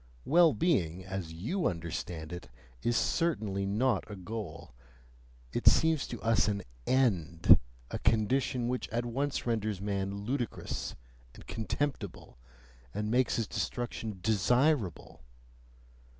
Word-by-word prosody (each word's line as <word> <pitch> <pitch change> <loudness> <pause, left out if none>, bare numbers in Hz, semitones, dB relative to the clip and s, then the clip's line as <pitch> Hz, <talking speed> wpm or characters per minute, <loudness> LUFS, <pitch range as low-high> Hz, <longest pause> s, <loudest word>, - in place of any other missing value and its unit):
Well 170 0 +6
being, 95 - +1
as 95 -3 -4
you 115 - -1
understand 85 -1 -4
it 85 -8 -8 0.3
is 120 0 +1
certainly 110 - 0
not 110 +2 +1
a 105 - -6
goal; 95 -3 -7 0.8
it - - -2
seems 160 -2 +5
to 120 - -6
us 115 -1 +3
an 100 -2 -1 0.2
END; 95 - +4 0.3
a - - -3
condition 120 +3 +2
which 125 +1 -2
at 120 +2 -1
once 135 +4 -1
renders 110 -4 0
man 100 0 -2
ludicrous 125 0 -3 0.4
and - - -13
contemptible 115 - -3 0.6
and 105 +1 -1
makes 125 +1 +3
his 115 - 0
destruction 110 -2 -3
DESIRABLE! 110 - +1
110 Hz, 120 wpm, -31 LUFS, 95-125 Hz, 0.8 s, Well